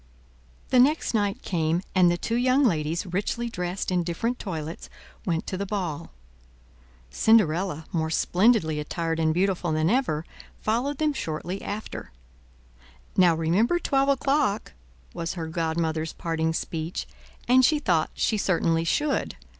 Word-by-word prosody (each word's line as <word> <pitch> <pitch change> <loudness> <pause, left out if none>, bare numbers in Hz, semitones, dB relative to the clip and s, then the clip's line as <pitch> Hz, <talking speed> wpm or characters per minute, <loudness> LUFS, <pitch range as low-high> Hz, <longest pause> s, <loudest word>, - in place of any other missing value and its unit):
The 255 - +4
next 290 +4 +3
night 205 +1 0
came, 165 0 0
and 185 -2 +5
the 175 - +1
two 225 - -3
young 255 +4 +3
ladies, 165 -2 0
richly 205 +6 -2
dressed 180 -1 -3
in 180 -1 +2
different 205 +9 -2
toilets, 165 -5 -5 0.4
went 165 -2 0
to 185 - -4
the 200 - -2
ball. 175 -6 -3 1.0
Cinderella, 180 - +2
more 160 -2 -1
splendidly 175 -2 +2
attired 165 +2 -2
and 160 -1 +2
beautiful 180 0 0
than 155 +3 +2
ever, 195 - 0 0.3
followed 245 +6 -1
them 305 0 +1
shortly 175 - -4
after. 205 - -6 1.0
"Now 180 -3 +5
remember 180 - +2
twelve 275 -4 +1
o'clock," 270 - +1 0.4
was 165 +2 -4
her 165 -2 -4
godmother's 160 -1 -2
parting 160 -1 -1
speech; 165 +1 -3 0.4
and 255 +1 +6
she 305 +4 +4
thought 175 - +1
she 220 - +1
certainly 165 -3 +1
should. 290 - 0
180 Hz, 140 wpm, -26 LUFS, 160-230 Hz, 1.0 s, and